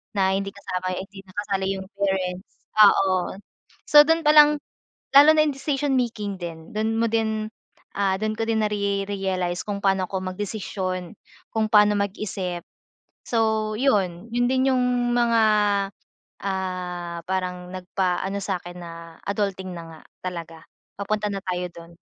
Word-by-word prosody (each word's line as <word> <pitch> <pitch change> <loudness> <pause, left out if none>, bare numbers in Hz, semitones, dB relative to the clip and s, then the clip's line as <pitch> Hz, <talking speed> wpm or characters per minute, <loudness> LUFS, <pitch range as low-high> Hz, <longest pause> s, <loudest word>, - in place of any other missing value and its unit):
na 190 -1 +2
hindi 195 0 -2
kasama, 185 -2 -4
hindi 195 +1 -8
na 185 - -18
kasali 195 -2 -1
yung 190 - -8
parents, 190 -2 -1 0.3
oo. 190 -1 +3 0.5
So, 295 0 +9
dun 325 +1 +2
palang 300 -1 +7 0.6
lalo 290 +2 +10
na 305 - +5
yung 295 - +1
decision 275 0 -1
making 210 -5 -3
din, 165 -1 -7
dun 220 +1 0
mo 230 - +3
din, 220 -1 0 0.5
ah, 195 -1 +1
dun 215 0 -1
ko 225 - -1
din 220 -1 +2
nare-realize 195 -3 -1
kung 205 -1 -3
paano 190 -1 +2
ako 190 - -2
magdesisyon, 185 -3 -4 0.4
kung 220 -1 +1
paano 210 -1 +6
mag-isip. 190 -3 -3 0.6
So, 220 -2 +1
yun, 200 -6 +1
yun 245 +1 +1
din 260 +1 +2
yung 245 -1 +1
mga, 235 -2 +3 1.0
ah, 180 -3 -3
parang 180 -1 -2
nagpaano 185 +1 -2
sa'kin 180 -2 -4
na 170 -1 -8 0.3
adulting 195 -2 -2
na 170 - -7
nga 155 - -13 0.3
talaga, 170 -2 -5 0.4
papunta 210 +1 -1
na 200 -1 -3
tayo 180 -1 -2
dun, 170 0 -12
195 Hz, 140 wpm, -24 LUFS, 185-220 Hz, 1.0 s, lalo